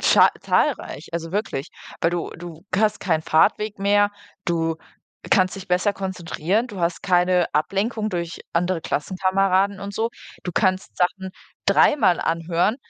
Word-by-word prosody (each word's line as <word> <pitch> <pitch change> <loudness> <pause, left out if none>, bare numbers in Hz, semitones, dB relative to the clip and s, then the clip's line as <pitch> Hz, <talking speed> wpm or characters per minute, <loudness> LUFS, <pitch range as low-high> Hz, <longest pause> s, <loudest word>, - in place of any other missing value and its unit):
za - - +6
zahlreich, 155 - 0
also 165 -1 -4
wirklich. 180 -8 -2 0.3
Weil 165 - +2
du 175 -1 -3
du 170 0 -10
hast 210 +2 +2
keinen 160 -5 0
Fahrtweg 205 +6 +2
mehr. 205 +1 +3 0.3
Du 165 -2 0 0.5
kannst 185 0 +3
dich 195 - -9
besser 180 +3 +2
konzentrieren. 190 +2 -2
Du 205 -6 -8
hast 170 0 -1
keine 180 -1 +3
Ablenkung 210 +8 0
durch 170 -1 -4
andere 175 0 0
Klassenkameraden 190 +4 +1
und 200 +1 -6
so. 225 +1 0 0.3
Du 180 - -4
kannst 185 0 0
Sachen 190 +1 0 0.4
dreimal 185 - +4
anhören 170 +6 0
185 Hz, 140 wpm, -23 LUFS, 170-200 Hz, 0.5 s, za